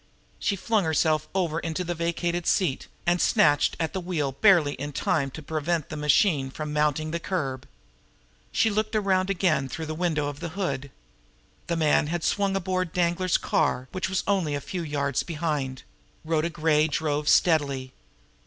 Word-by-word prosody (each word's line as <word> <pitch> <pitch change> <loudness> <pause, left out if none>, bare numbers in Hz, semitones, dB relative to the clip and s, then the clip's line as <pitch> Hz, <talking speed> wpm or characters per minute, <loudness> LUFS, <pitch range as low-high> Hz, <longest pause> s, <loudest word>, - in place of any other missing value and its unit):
She 200 - 0
flung 215 +2 +1
herself 155 -1 +1
over 170 -4 0
into 165 +2 -3
the 175 0 -2
vacated 170 +1 -2
seat, 160 -9 +1 0.2
and 175 0 +2
snatched 145 -1 +3
at 160 +2 -1
the 190 - -2
wheel 165 -6 -1
barely 160 -1 +4
in 145 +2 -6
time 140 0 0
to 155 +4 -9
prevent 155 +1 -2
the - - -5
machine 150 -1 +2
from 150 +2 -5
mounting 150 +1 +1
the 170 - -2
curb. 135 -8 -3 0.8
She 220 - +2
looked 215 +1 -1
around 190 -2 +2
again 170 -8 +1
through 160 +4 -5
the 155 - -4
window 160 -3 0
of 145 0 -6
the - - -4
hood. 140 -8 -2 0.8
The 170 - -1
man 155 -1 +3
had 170 +1 -2
swung 200 -1 +1
aboard 185 -2 -1
Danglar's 175 +1 +1
car, 130 -4 0
which 185 0 -2
was 190 - -1
only 185 -7 +1
a - - -2
few 180 +5 -5
yards 145 -4 -1
behind. 150 -6 -3 0.4
Rhoda 160 +1 +1
Gray 155 -1 +2
drove 150 -1 -1
steadily. 140 -7 +2
160 Hz, 170 wpm, -26 LUFS, 145-180 Hz, 0.8 s, barely